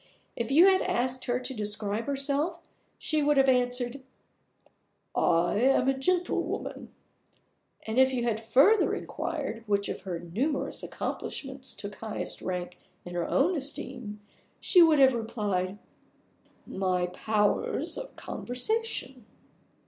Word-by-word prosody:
If 235 -1 -3
you 315 +7 +7
had 380 -1 +5
asked 255 +1 -1
her 245 -1 0
to 255 +1 -5
describe 210 0 -1
herself, 285 +5 0 0.4
she 310 -1 0
would 295 0 +3
have 270 0 +5
answered, 250 0 +1 1.1
"I 170 +4 +2
am 260 +1 +3
a 270 - +3
gentlewoman"; 355 +7 -1 0.9
and 220 +3 0
if 260 0 +6
you 250 -2 -1
had 225 -2 -1
further 275 - +4
inquired 225 0 -4
which 200 -1 +1
of - - -4
her 180 -3 -4
numerous 230 - -2
accomplishments 270 -1 -4
took 205 0 -7
highest 220 -2 -4
rank 180 -1 -4 0.3
in 175 - -7
her 175 -1 -1
own 335 +7 +2
esteem, 250 -7 -5 0.4
she 360 - +5
would 320 -2 +6
have 265 -2 +6
replied, 205 -5 -2 0.9
"My 185 -2 0
powers 210 +3 0
of - - -7
conversation." 255 - -3
245 Hz, 125 wpm, -28 LUFS, 210-275 Hz, 1.1 s, you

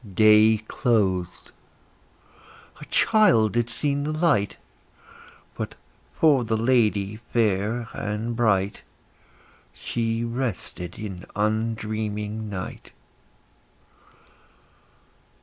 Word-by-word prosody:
Day 110 +1 +6
closed; 95 -7 0 1.3
a - - -9
child 175 - +3
had 120 0 +1
seen 140 +4 -1
the 150 - -2
light; 155 - +1 1.0
But, - - -5 0.4
for 145 -6 +4
the 110 -1 -1
lady 110 -4 +1
fair 110 +1 0
and 105 +3 -3
bright, 100 -4 +1 0.9
She 115 - -2
rested 115 -7 -4
in 95 -5 -7
undreaming 110 0 -2
night. 95 -2 -7
110 Hz, 80 wpm, -24 LUFS, 105-120 Hz, 1.3 s, Day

